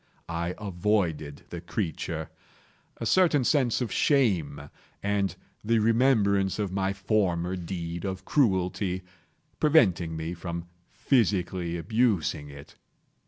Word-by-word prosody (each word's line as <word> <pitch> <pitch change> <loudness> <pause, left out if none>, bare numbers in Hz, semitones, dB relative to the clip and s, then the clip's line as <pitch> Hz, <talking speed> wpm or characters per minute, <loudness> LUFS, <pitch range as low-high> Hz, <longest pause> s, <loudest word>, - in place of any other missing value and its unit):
I 85 +1 -2
avoided 90 -7 -1
the 85 - -5
creature; 85 -3 -4 0.7
a 115 - -5
certain 160 0 +4
sense 130 -3 +2
of 120 - -2
shame, 85 - +1 0.3
and 100 -2 0 0.3
the 115 +2 +2
remembrance 110 -4 +3
of 105 -3 -2
my 95 0 0
former 95 -3 0
deed 85 -1 -5
of 95 -1 -4
cruelty, 95 -6 +1 0.6
preventing 95 - +3
me 80 +2 -4
from 85 0 -5 0.3
physically 95 -8 0
abusing 85 -6 0
it. 70 0 -13
95 Hz, 110 wpm, -27 LUFS, 85-110 Hz, 0.7 s, certain